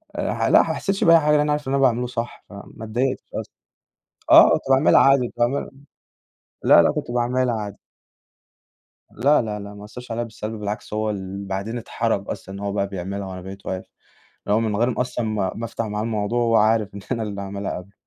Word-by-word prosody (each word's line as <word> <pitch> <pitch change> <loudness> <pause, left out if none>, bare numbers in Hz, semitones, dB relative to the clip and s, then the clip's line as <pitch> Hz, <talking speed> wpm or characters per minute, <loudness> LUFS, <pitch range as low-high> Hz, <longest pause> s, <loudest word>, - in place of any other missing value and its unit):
آآ، - - -1
ح - - -3
لأ، - - +6
ما - - -1
حسيتش 195 0 -1
بأي 165 0 +7
حاجة، 150 -1 +1
لإن 150 - +5
أنا 150 - +1
عارف 150 -1 -2
اللي 135 - 0
أنا 140 - +1
باعمله 125 -2 +2
صح 120 -1 -5
فما 100 +2 -11
اتضايقتش 125 +4 -1
أصلًا. - - -6 0.8
آه، - - +9
كنت - - +1
باعملها 135 +3 +5
عادي، 135 -3 +4
تمام، 120 +4 0 0.9
لا، - - +7
لأ، - - +3
كنت - - -4
باعملها 125 0 +1
عادي. 105 -2 -7 1.3
لا، 140 +7 +3
لا، 105 -2 -4
لا، 100 0 -8
ما 105 0 -10
أثرش 125 +3 -10
عليه 115 +1 -1
بالسَلب، 110 -1 -6
بالعكس 105 +1 -5
هو 110 0 -1
اللي 100 -1 -5
بعدين 100 +5 -3
اتحرج 115 -3 -2
أصلًا 95 - -6
إن - - -7
هو 100 0 -3
بقى 100 0 -1
بيعملها 100 +1 -5
وأنا 95 -1 -7
بقيت 95 +2 -10
واقف، 95 0 -4 0.6
اللي 105 - +2
هو - - +2
من 110 -2 -1
غير 120 +2 0
أصلًا 125 -1 -2
ما 100 -4 -1
ما 115 - -5
أفتَح 115 0 -4
معاه 105 -1 -3
الموضوع 110 +1 -1
هو 115 -1 +3
عارف 110 -2 +2
إن 100 - -7
أنا 115 -3 -2
اللي 100 -2 -4
عاملها 100 0 -4
قبله، 90 +2 -10
110 Hz, 215 wpm, -22 LUFS, 100-120 Hz, 1.3 s, آه